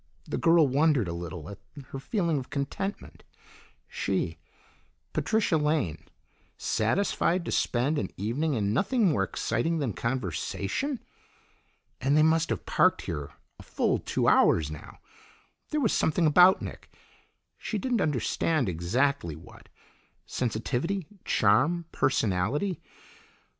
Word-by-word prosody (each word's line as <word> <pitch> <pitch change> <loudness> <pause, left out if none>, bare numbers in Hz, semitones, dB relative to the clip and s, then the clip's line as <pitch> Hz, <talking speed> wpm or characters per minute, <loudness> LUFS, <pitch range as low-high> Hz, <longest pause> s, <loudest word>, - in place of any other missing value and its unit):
The - - -3
girl 165 -2 +5
wondered 140 - +2
a 85 - -3
little 85 -2 -6
at 100 - -9 0.3
her 135 - -6
feeling 170 - 0
of 130 - -9
contentment; 145 +8 -4 0.6
she, - - -2 0.7
Patricia 220 -7 +1
Lane, 150 - -1 0.5
satisfied 170 - 0
to - - -3
spend 135 +6 +1
an - - -3
evening 130 - -1
in 105 -2 0
nothing 205 - +2
more 145 - +1
exciting 120 +10 -1
than 135 -8 -1
conversation! 120 - -2 1.0
And 140 +3 +2
they 155 - +6
must 160 +1 +3
have 115 -6 -3
parked - - +2
here 70 -1 -5 0.3
a - - -9
full - - 0
two - - -1
hours 75 -2 +4
now. 75 - -10 0.7
There 305 - 0
was 230 -8 +2
something 160 +2 +2
about 180 +5 +6
Nick - - -9 0.7
she 215 - -3
didn't 240 +1 0
understand 150 - 0
exactly 90 - 0
what; 80 - -15 0.6
sensitivity, 130 - -2 0.2
charm, 140 +12 +2
personality. 130 - 0
140 Hz, 120 wpm, -28 LUFS, 105-170 Hz, 1.0 s, they